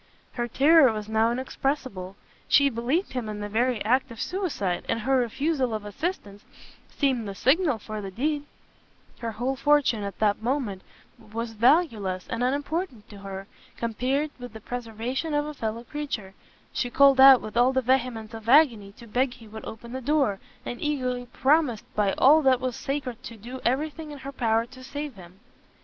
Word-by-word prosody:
Her 240 -1 -3
terror 280 +2 +6
was 215 -1 -5
now 220 +1 +2
inexpressible; 260 -6 -3 0.3
she 280 -1 +5
believed 255 - -1
him 245 -4 -3
in 210 -1 -5
the 205 - -4
very 230 +1 0
act 260 +4 +2
of 230 -1 -10
suicide, 310 - -2
and 230 - 0
her 265 +4 +2
refusal 260 0 0
of 210 -1 -5
assistance 205 - -4 0.5
seemed 260 -6 0
the 195 - -6
signal 290 - +3
for 215 0 -6
the 195 - -5
deed: 290 +8 -2 0.7
her 230 -1 -4
whole 250 +5 -1
fortune, 285 -5 +3
at 200 -1 -5
that 210 -1 +1
moment, 235 -6 -1 0.4
was 225 +2 -5
valueless 220 - +2
and 230 +2 -1
unimportant 285 - -2
to 205 - -11
her, 195 0 -7 0.3
compared 255 +6 -1
with 245 -2 -8
the 220 - -8
preservation 245 +6 -4
of 295 0 +1
a 300 - -5
fellow 225 -3 -4
creature: 240 -8 -5 0.4
she 245 - -1
called 275 +1 +5
out 265 -1 +10
with 215 - -8
all 245 +2 +5
the 260 0 0
vehemence 240 -3 0
of 225 0 -7
agony 240 -8 +5
to 235 - -14
beg 245 +3 0
he 225 - -14
would 220 +1 -9
open 235 +2 -9
the 260 +1 -5
door, 270 -7 +1 0.3
and 240 - -5
eagerly 255 -4 -2
promised 275 -5 +2
by 205 -2 +1
all 300 +4 +6
that 260 -3 +4
was 255 -2 -2
sacred 265 -4 -4
to 235 -3 -9
do 245 +5 -8
everything 300 +5 -1
in 295 - -8
her 275 +1 -7
power 230 -3 +1
to 255 +2 -14
save 285 +2 -5
him. 185 -2 -14
245 Hz, 180 wpm, -26 LUFS, 220-275 Hz, 0.7 s, out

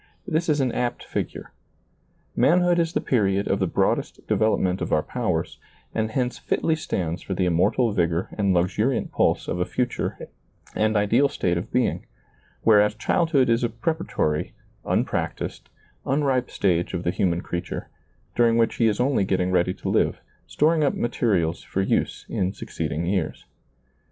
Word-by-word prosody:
This 165 -1 0
is 150 -1 +2
an 130 -2 +1
apt 120 0 -2
figure. - - -5 0.8
Manhood 175 +2 +4
is 165 0 0
the - - +1
period 100 -5 +1
of - - +1
the - - +1
broadest - - -1
development 95 -4 +1
of - - -3
our 75 - +2
powers, - - -2 0.3
and 110 -1 0
hence 125 +2 -2
fitly 160 - 0
stands 90 - -3
for 95 - -4
the 95 - +1
immortal 90 +7 +2
vigor 85 -2 0
and 100 -2 +1
luxuriant 100 +8 +1
pulse - - +1
of 90 - -2
a - - +3
future 125 +6 -2 0.6
and 110 0 +2
ideal 115 +7 +3
state 90 -9 0
of 85 - -4
being; 125 -1 0 0.6
whereas 105 -1 +5
childhood 140 +4 +2
is 115 +1 +2
a 120 - +1
preparatory, 115 - -2 0.3
un - - +1
practised, - - -4 0.3
unripe 135 -3 +1
stage 90 -1 0
of 90 - -3
the 85 - +1
human 85 -2 0
creature, 85 0 -5 0.5
during 115 -1 +4
which 115 -1 +2
he 115 - +3
is 105 -2 0
only 125 -4 +2
getting 95 -1 0
ready 90 0 +2
to - - -7
live, - - +1 0.3
storing 155 +1 +2
up 140 - +1
materials 100 -8 0
for 95 - -2
use - - -1
in 95 0 -1
succeeding 80 +3 -4
years. 90 -3 -2
110 Hz, 160 wpm, -24 LUFS, 90-125 Hz, 0.8 s, whereas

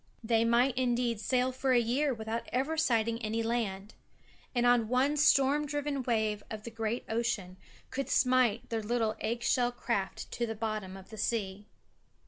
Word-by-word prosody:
They 225 0 +2
might, 240 +3 +3
indeed, 240 -3 0
sail 255 +2 +1
for 260 0 0
a 245 - +5
year 260 +5 +1
without 225 -1 -4
ever 270 +6 0
sighting 230 -7 +1
any 225 +1 -1
land; 215 -3 -2 0.6
and 245 -2 +3
one 260 +4 +2
storm 290 0 +4
driven 290 -1 -2
wave 220 -4 0
of 215 -1 -6
the 235 - -7
great 225 +1 -3
ocean 220 -5 -2 0.4
could 275 0 -3
smite 250 -4 +2
their 225 -1 -1
little 225 0 0
egg 235 +2 -2
shell 245 -1 +2
craft 220 -5 -3
to 235 - -2
the 225 - -4
bottom 215 -3 -4
of 190 +2 -14
the 220 - -8
sea. 205 -2 -2
235 Hz, 165 wpm, -31 LUFS, 220-255 Hz, 0.6 s, a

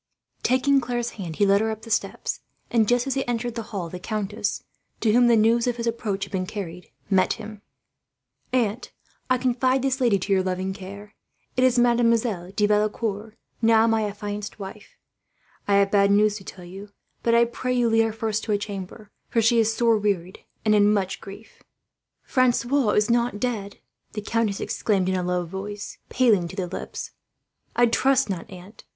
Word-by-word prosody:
Taking 270 +2 +3
Claire's 240 -1 -2
hand, 175 -6 -7
he 205 - +3
led 200 +1 +4
her 220 - 0
up 220 0 -5
the 230 - -9
steps; - - -1 0.3
and 225 -3 +3
just 245 +1 +2
as 270 - -1
he 270 0 0
entered 240 0 -2
the 230 - -4
hall 190 -5 -4
the 180 +2 -7
countess, 210 +1 -3 0.4
to 215 -2 +2
whom 245 +1 +5
the 235 - +5
news 230 +2 +3
of 240 -1 0
his 235 - -3
approach 220 -4 -2
had - - -17
been 185 -1 -2
carried, 180 -4 -7 0.2
met 190 -1 +3
him. 215 -2 -9 0.9
"Aunt," 235 -2 0
he - - -26
said, - - -37 0.4
"I 255 - +4
confide 255 +1 +1
this 270 0 0
lady 235 -5 +4
to 195 +1 -1
your 190 - +3
loving 185 +1 -2
care. 200 +2 -10 0.4
It 255 - +2
is 255 -1 +4
Mademoiselle 235 -6 +2
de 205 +1 +1
Valecourt, 210 0 -1 0.2
now 225 -1 +5
my 225 -1 +2
affianced 205 0 -5
wife. 200 0 -10 0.7
I 200 - +3
have 200 0 +3
bad 200 -1 +4
news 210 +1 +4
to 195 - -11
tell 180 -1 -10
you; 195 +3 -10 0.3
but 230 0 +2
I 235 0 +5
pray 245 +2 -4
you 245 -1 +2
lead 225 0 +4
her 225 - -1
first 220 0 -2
to 220 - -2
a 205 - +3
chamber, 205 0 -7 0.2
for 230 - +1
she 230 +1 +4
is 225 0 +3
sore 230 -1 +2
wearied 190 -3 -1 0.3
and 215 - +4
in 205 0 +5
much 195 -2 -1
grief." 200 +3 -12 0.6
"Francois 255 0 +2
is 210 +2 +2
not 235 -3 +1
dead?" 210 -5 -3 0.4
the 210 - -4
countess 220 -2 0
exclaimed 195 -4 0
in 190 - +1
a 185 - 0
low 180 0 -1
voice, 200 +4 -7
paling 215 -9 +3
to - - -9
the 185 - -2
lips. 175 - -6 0.6
"I 240 - +5
trust 265 0 +2
not, 175 -3 -5
aunt. 185 +3 -12
215 Hz, 195 wpm, -24 LUFS, 200-235 Hz, 0.9 s, whom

